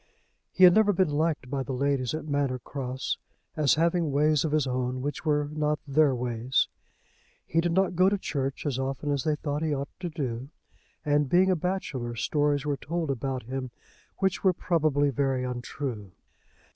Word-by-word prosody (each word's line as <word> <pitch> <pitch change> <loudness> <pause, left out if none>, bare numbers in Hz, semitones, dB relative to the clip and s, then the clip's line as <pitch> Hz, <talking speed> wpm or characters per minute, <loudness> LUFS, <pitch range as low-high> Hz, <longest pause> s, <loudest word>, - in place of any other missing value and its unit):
He 185 - +2
had 180 -1 +10
never 215 0 +5
been 180 -4 +2
liked 155 -2 0
by 140 -1 -1
the 130 0 -4
ladies 135 0 0
at 155 - -5
Manor 140 -3 0
Cross, 130 0 -4 0.4
as 150 -3 +3
having 170 -1 +1
ways 150 +1 +3
of 160 - -1
his 155 -2 +2
own 130 0 -2
which 145 +3 -4
were 150 -1 +2
not 150 0 0
their 140 -1 +3
ways. 120 +1 0 0.8
He 165 - +1
did 175 0 0
not 190 0 +2
go 185 +2 +5
to 205 - 0
church 135 -7 -3
as 135 -3 -1
often 135 +2 -2
as 140 -3 -1
they 155 -1 +2
thought 145 0 -3
he 155 -2 0
ought 140 0 -4
to 175 - -3
do; 130 -5 -4 0.6
and, 145 -1 +2
being 185 +4 +4
a - - +3
bachelor, 150 -9 -3
stories 145 +4 +1
were 145 -1 0
told 160 +2 -2
about 130 0 -3
him 130 +2 -4 0.5
which 190 -1 0
were 190 -2 +5
probably 155 -5 +1
very 135 -1 0
untrue. 125 -4 -5
145 Hz, 185 wpm, -27 LUFS, 130-160 Hz, 0.8 s, had